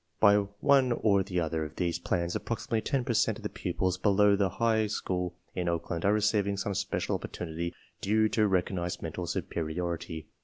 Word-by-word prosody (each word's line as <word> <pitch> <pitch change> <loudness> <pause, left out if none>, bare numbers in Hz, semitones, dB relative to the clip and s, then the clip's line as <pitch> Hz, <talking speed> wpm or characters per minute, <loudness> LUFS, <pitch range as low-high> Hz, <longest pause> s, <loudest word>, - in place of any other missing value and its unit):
By 100 0 +7 0.2
one 135 -3 +5
or 100 -4 +3
the 95 -2 -2
other 80 -1 -1
of 75 0 -7
these 85 -2 -1
plans 85 0 -1
approximately 115 -1 -2
10 135 0 0
per 120 - -1
cent - - +2
of - - -12
the - - -2
pupils 95 0 -2
below 105 0 +4
the 100 -1 +2
high 110 +2 +1
school 90 -4 -2 0.2
in 90 -1 -1
Oakland 85 0 -2
are 100 - +5
receiving 105 -1 +2
some 100 +1 -2
special - - -1
op - - -1
portunity 85 0 -4 0.3
due 110 +2 +3
to 105 0 +2
recognized 90 -2 -1
mental - - -4
superiority. 85 0 -3
95 Hz, 185 wpm, -29 LUFS, 85-105 Hz, 0.3 s, By